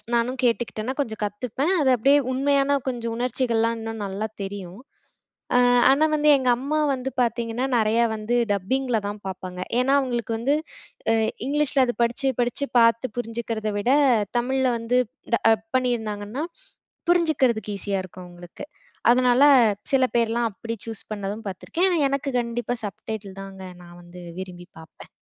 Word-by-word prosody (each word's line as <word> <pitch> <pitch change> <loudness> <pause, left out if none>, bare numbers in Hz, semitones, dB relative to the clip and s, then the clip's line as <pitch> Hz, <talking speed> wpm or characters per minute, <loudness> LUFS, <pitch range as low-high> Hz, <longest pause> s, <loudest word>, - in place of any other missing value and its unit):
நானும் 245 +2 0
கேட்டுக்கிட்டேன்னா, 235 0 0
கொஞ்சம் 220 -5 -5
கத்துப்பேன். 250 - -2
அது 265 - +4
அப்படியே 275 +6 +4 0.2
உண்மையான 280 +1 +2
கொஞ்சம் 230 -2 -4
உணர்ச்சிகள்லாம் 230 -2 0
இன்னும் 225 -1 -5
நல்லா 200 +3 -3 0.2
தெரியும். 195 -1 -7 0.8
அ - - +6 0.3
ஆனா 290 +3 +4
வந்து, 300 0 +3
எங்க 255 -2 0
அம்மா 285 +5 -1
வந்து 260 0 -4
பார்த்தீங்கன்னா, 235 +2 -1
நெறையா 225 +2 +3
வந்து 220 +3 -1 0.2
டப்பிங்ல 235 +4 0
தான் 205 0 -6
பார்ப்பாங்க. 185 -1 -6 0.2
ஏன்னா 270 +2 +3
அவுங்களுக்கு 240 -3 -2
வந்து 275 +5 +2 0.6
அ - - +4 0.3
இங்கிலீஷில 285 -2 +2
அது 240 - -2
படிச்சு, 240 +3 0
படிச்சு 245 +4 -1
பார்த்து 230 +1 +2
புரிஞ்சிக்கறத 230 -2 -3
விட, 240 +5 +1 0.5
தமிழ்ல 260 +2 0
வந்து 240 +2 +1
இப்ப 255 +6 -34 0.3
டப் 225 0 +2
பண்ணீருந்தாங்கன்னா, 225 0 -2 0.7
புரிஞ்சிக்கிறதுக்கு 265 - +2
ஈஸியா 195 0 -2
இருக்கும் 185 0 -11
அவங்களுக்கு. 175 0 -11 0.5
அதனால 250 +2 +4 0.5
சில 265 -2 +4
பேர்லாம், 235 0 +2
அப்படி 230 +3 -6
சூஸ் 225 -3 -6
பண்ணதும் 205 +1 -5
பார்த்துருக்கேன். 325 - -1
ஆனா 350 - +1
எனக்கு 275 0 -2
கண்டிப்பா 240 +1 -2
சப்டைட்டில் 200 -1 -7
தாங்க, 190 -1 -10 0.2
நான் 175 0 -14
வந்து 175 +1 -12 0.2
விரும்பி 180 -1 -8
பார்ப்பேன். 160 - -14
235 Hz, 145 wpm, -24 LUFS, 210-260 Hz, 0.8 s, அ